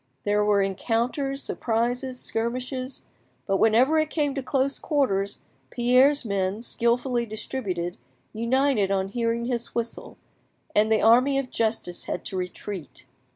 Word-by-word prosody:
There 210 0 +2
were 205 -1 +3
encounters, 245 +8 -1
surprises, 245 +3 -1
skirmishes; 255 +3 -3 0.4
but 195 -1 +1
whenever 245 +10 +4
it 310 0 0
came 295 -3 0
to 275 - -3
close 270 +1 0
quarters, 200 - 0 0.3
Pierre's 255 +3 +4
men, 200 +1 -1
skilfully 240 0 0
distributed, 200 -6 -4 0.4
united 235 -2 +2
on 195 -1 0
hearing 235 +1 -1
his 240 -1 -3
whistle, 235 0 -4 0.6
and 215 +1 +3
the 220 - +3
Army 255 +5 +5
of 270 -2 -2
justice 215 -6 -1
had - - -4
to - - -4
retreat. 180 -2 -6
235 Hz, 130 wpm, -25 LUFS, 210-260 Hz, 0.6 s, Army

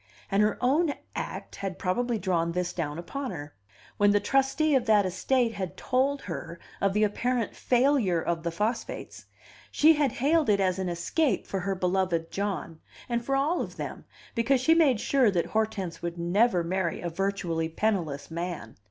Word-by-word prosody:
And 195 +1 +3
her 210 0 +2
own 285 +4 +2 0.2
act - - -5
had 195 -2 -4
probably 235 +6 0
drawn 170 -3 0
this 180 0 -2
down 155 -3 -3
upon 270 +10 -5
her. 145 -6 -7 0.4
When 205 0 +4
the 205 0 +4
trustee 270 +6 +2
of 255 -3 +2
that 210 -2 +5
estate 230 +6 +1
had 190 -4 -5
told 270 +2 0
her 170 0 -6 0.2
of 195 -1 +2
the 210 +1 +2
apparent 235 +2 0
failure 245 -8 +2
of 165 0 -2
the 170 - -2
phosphates, 210 +8 -4 0.4
she 315 +2 +5
had 290 -5 +1
hailed 300 +2 +2
it 200 -1 +4
as 185 -1 +1
an 185 -1 -1
escape 245 - 0
for 195 - -3
her 195 +2 -2
beloved 180 -2 0
John, 195 -5 -3 0.3
and 235 -1 -1
for 270 +3 0
all 295 +6 +1
of - - -6
them, - - -6 0.3
because 250 +3 +2
she 290 +6 +4
made 295 -9 +4
sure 260 0 +3
that 175 -4 0
Hortense 215 -5 -2
would 170 0 -4
never 180 +2 +2
marry 175 0 -1
a 175 - -4
virtually 175 -3 -1
penniless 165 -7 -1
man. 170 -8 -5
200 Hz, 180 wpm, -27 LUFS, 175-250 Hz, 0.4 s, that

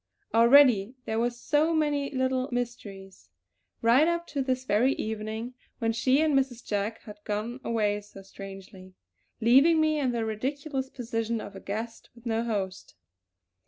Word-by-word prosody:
Already 235 -2 +6
there 220 0 -1
were 240 +1 +2
so 295 +7 +1
many 290 -2 +1
little 260 0 -1
mysteries; 200 - -6 0.5
right 250 +7 +5
up 340 0 0
to 285 -4 -3
this 260 -1 -1
very 250 +5 +3
evening 220 +2 -4 0.2
when 225 -1 0
she 260 +5 +2
and 315 -2 +2
Mrs. 265 -3 0
Jack 210 +2 -2
had 210 -1 -11
gone 215 +4 -3
away 210 -3 0
so 200 -1 -14
strangely, 195 -1 -11 0.5
leaving 275 +8 +5
me 310 -1 +2
in 260 -3 +1
the 230 -2 -1
ridiculous 265 +5 -3
position 230 -2 -3
of 200 - -9
a - - -7
guest 225 +3 -6
with 235 0 -18
no 225 0 0
host. 195 -5 -4
235 Hz, 155 wpm, -28 LUFS, 215-265 Hz, 0.5 s, Already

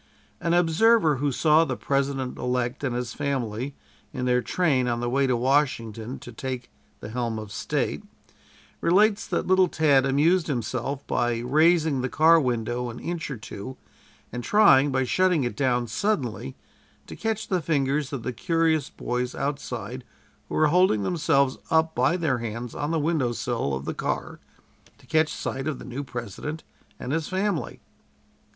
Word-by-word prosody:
An 170 0 +1
observer 175 -1 +4
who 145 +2 0
saw 155 +4 +4
the 130 -6 -3
President 135 -2 -1
elect 125 +1 -2
and 130 -3 -1
his 125 -1 -3
family 135 -2 -3 0.4
in 125 -3 -3
their 125 0 +2
train 130 0 +1
on 120 -1 0
the 120 - -2
way 135 +1 +2
to 125 -2 +1
Washington 125 -3 0
to 120 - -9
take 125 +1 -6 0.3
the - - -7
helm 115 -1 -2
of 105 -2 -7
State, - - -2 0.8
relates 205 +4 +3
that - - -1
little 185 0 +4
Tad 140 -5 +3
amused 160 +6 +3
himself 130 +1 -3
by 120 -1 0
raising 155 +3 +3
the 130 - -2
car 165 +3 +5
window 120 -1 -1
an 115 - -8
inch 170 -2 -4
or 135 - -4
two 110 +4 -8 0.5
and 120 +1 -5
trying, 145 - +5
by 130 0 +1
shutting 180 +3 +2
it 120 - -2
down 125 -3 +1
suddenly, 115 - -2 0.5
to - - -9
catch 220 -1 -2
the 185 -2 0
fingers 145 -2 0
of 135 -5 -4
the 125 - -3
curious 160 +2 +1
boys 125 0 -3
outside 130 -4 -4 0.5
who - - -4
were 155 -1 +4
holding 180 - +4
themselves 140 - +1
up 160 0 +2
by 175 - +2
their 150 -8 0
hands 115 +1 -5
on 145 - -3
the 165 - 0
window 150 -6 0
sill 115 - -2
of 65 +1 -6
the - - -2
car - - -3 0.6
to - - -21
catch 155 -1 +2
sight 135 +2 -4
of 155 -4 -2
the - - -10
new 130 +3 -5
President 125 +5 -6 0.4
and 125 - -5
his 160 -1 -1
family. 190 -3 -2
135 Hz, 170 wpm, -25 LUFS, 120-160 Hz, 0.8 s, car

